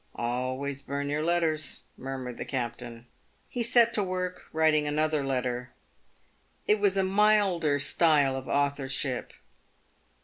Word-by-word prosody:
"Always 130 +3 -3
burn 140 0 -4
your 150 +1 -1
letters," 160 -3 0
murmured 130 -2 -6
the - - -4
captain. 120 -2 -5 0.4
He 245 - -4
set 235 0 +4
to 210 - +3
work 180 -1 -4
writing 155 -1 +2
another 155 0 +1
letter. 125 -2 -2 0.9
It 210 0 +3
was 200 -1 +2
a 195 - +3
milder 190 -6 +3
style 145 -1 +3
of 130 -1 -6
authorship. 140 -2 -1
145 Hz, 125 wpm, -28 LUFS, 130-180 Hz, 0.9 s, set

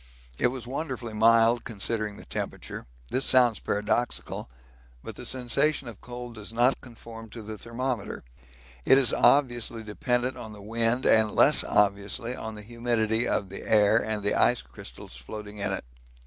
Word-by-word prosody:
It - - +4
was 125 -1 -5
wonderfully 130 -3 -4
mild 115 +2 +4
considering 105 -1 -2
the - - -12
temperature - - -5 0.2
this 130 - 0
sounds 125 -4 +4
paradoxical, 105 - -2 0.5
but - - -6
the - - -2
sensation 130 +3 +1
of 115 -4 -10
cold 120 -1 -8
does 110 -1 -6
not 120 +3 +2
conform 115 -2 -11
to 115 +1 -9
the 110 +1 -6
thermometer 115 0 -4 0.6
it 135 - +6
is 135 -3 +3
obviously 120 -5 +3
dependent 125 +4 -1
on 110 -1 -8
the 105 - -11
wind 115 +3 0
and 110 -1 +5
less - - +4
obviously 105 +4 +1
on 110 -2 -6
the 105 - -9
humidity 115 0 0
of 100 - -1
the 100 - -8
air 110 +1 +4
and 110 -2 -3
the 100 - +1
ice - - +3
crystals - - -10
floating 105 - -8
in 100 0 -1
it. 95 - -4
115 Hz, 160 wpm, -27 LUFS, 105-120 Hz, 0.6 s, it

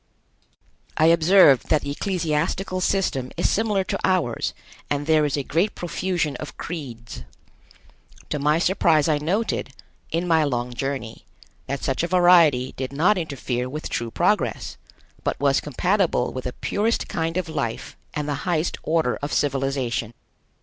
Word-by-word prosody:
I 155 - +4
observed 170 -5 +5
that 155 - +2
the 140 - -3
ecclesiastical 180 +2 -1
system 180 -10 0
is - - +2
similar 210 -3 +1
to - - -3
ours, 180 -11 0 0.3
and 145 0 -1
there 155 -1 +3
is 145 0 -1
a 140 - -1
great 170 +10 0
profusion 175 -4 -2
of 150 - -8
creeds. 125 -9 -7 1.1
To 150 - -1
my 150 +2 +2
surprise 170 -4 +3
I 150 -2 +2
noted, 175 -3 -1 0.4
in 170 +2 -1
my 160 -2 +4
long 125 -3 -2
journey, 135 -3 -4 0.4
that 140 -1 -4
such 135 - 0
a 170 - 0
variety 170 -8 +5
did 130 0 -5
not 170 +9 +3
interfere 130 -6 -3
with 150 +4 -5
true 120 -1 -2
progress, - - 0 0.5
but - - -2
was 140 -1 +2
compatible 175 - 0
with 130 - -6
the 125 - -3
purest 220 +10 -1
kind 165 +1 -2
of 185 -3 -1
life 140 -8 -4 0.2
and 150 -1 -2
the 145 - -1 0.2
highest 170 -1 0
order 160 -5 0
of 145 0 -3
civilization. 135 -5 -1
150 Hz, 150 wpm, -23 LUFS, 135-175 Hz, 1.1 s, observed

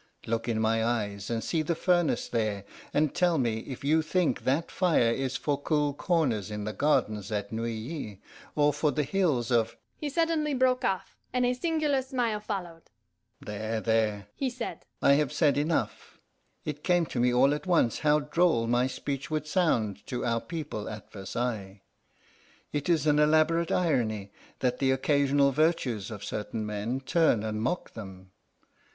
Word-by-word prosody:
Look 115 +1 -2
in 110 -1 0
my 110 0 +2
eyes, 105 -4 -2
and 115 -2 -1
see 160 +6 0
the 165 +2 -1
furnace 175 -1 +1
there, 110 -4 -1 0.3
and 150 -1 +1
tell 175 -2 +2
me 115 -5 0
if 130 +3 -8
you 155 +3 +3
think 165 +2 0
that 145 +6 +1
fire 165 -11 +3
is 135 +2 -1
for 145 -1 -1
cool 150 -1 +1
corners 145 - 0
in 105 -1 -4
the 105 +1 -3
gardens 105 -8 +1
at 100 -1 -2
Neuilly 115 - -4 0.4
or 150 -1 +3
for 150 +1 +1
the 150 - 0
Hills 140 -8 0
of 115 -1 +2
" - - -49
He 300 - -2
suddenly 310 -1 +1
broke 255 0 +2
off, 190 -1 -2
and 250 0 +1
a 245 - +2
singular 300 0 +1
smile 245 -5 -1
followed. 180 -6 -6 0.5
"There, 110 +2 -3
there," 110 -3 0
he 270 - -1
said, 245 -1 -6 0.2
"I - - +6
have 145 - -1
said 150 -4 +3
enough. 150 +3 -1 0.5
It 150 -1 -5
came 175 -2 +3
to 130 - -4
me 125 +1 +3
all 130 +3 +4
at 150 +4 -5
once 165 -10 +2
how 150 0 +3
droll 150 -5 +2
my 120 +2 +2
speech 135 +2 -4
would 155 -1 -1
sound 115 - +1
to 125 - -3
our 115 -1 +1
people 150 -11 -5
at 105 -1 -9
Versailles. 100 -1 -4 0.9
It 145 +3 -2
is 160 -4 +3
an 150 -1 +4
elaborate 155 +2 +3
irony 110 - 0 0.3
that 125 -1 0
the 135 - +2
occasional 140 +1 +3
virtues 135 - +1
of 105 -3 -7
certain 110 +1 -4
men 105 +5 -3
turn 135 -5 +2
and 110 0 -2
mock 130 +10 -2
them. 95 -4 -10
140 Hz, 170 wpm, -28 LUFS, 110-165 Hz, 0.9 s, I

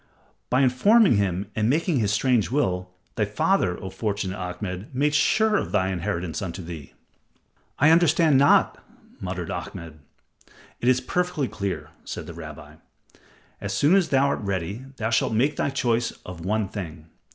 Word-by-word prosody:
By 130 - +3
informing 165 - +5
him 100 -1 -1
and 110 +1 +1
making 155 +1 +1
his 105 -3 +1
strange 115 0 +2
will, 90 -10 0 0.2
thy 105 - 0
father, 105 - +1
O 95 - -7
fortunate 100 -3 -3
Ahmed, 90 +1 -5
made 145 +3 +2
sure 220 +8 +3
of - - -3
thy 95 -3 +1
inheritance 90 +1 -3
unto 95 -1 -5
thee." 80 -5 -9 0.8
"I 155 +3 +5
understand 165 -3 +4
not," 140 - +4 0.4
muttered 90 -2 -4
Ahmed. 80 -2 -7 0.8
"It 120 - -2
is 130 0 +4
perfectly 165 0 -1
clear," 100 -3 -4
said - - -6
the 85 - -8
rabbi. 75 -2 -10 0.8
"As - - -3
soon 145 +5 +4
as 195 -4 +3
thou 140 0 +3
art - - -1
ready, 100 +4 -3
thou 110 +1 -2
shalt 115 - +1
make 135 +7 +2
thy - - 0
choice 120 -3 0 0.2
of 90 -3 -8
one 105 +2 0
thing. 85 -6 -7
105 Hz, 160 wpm, -24 LUFS, 90-135 Hz, 0.8 s, informing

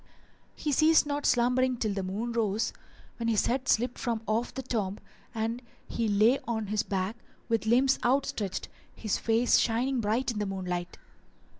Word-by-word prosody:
He 300 - -2
ceased 310 +3 +5
not 290 0 -1
slumbering 250 +1 +2
till 215 -3 -1
the 195 - -2
moon 205 +6 -3
rose, 220 -2 0 0.4
when 230 - -2
his 220 -3 +2
head 260 +2 -1
slipped 245 +2 +1
from 230 -2 -2
off 225 +3 0
the 265 - -6
tomb 210 -6 -2 0.4
and 225 +2 -2 0.3
he 230 - -1
lay 215 +6 +4
on 220 -2 -1
his 210 - +2
back, 195 +2 -2 0.3
with 225 -1 0
limbs 260 +4 +4
outstretched, 240 -6 0 0.3
his 215 -3 -2
face 230 +2 +3
shining 245 +3 +1
bright 230 +5 0
in 215 - -4
the 210 - -1
moonlight. 180 -2 -4
230 Hz, 165 wpm, -29 LUFS, 210-250 Hz, 0.4 s, ceased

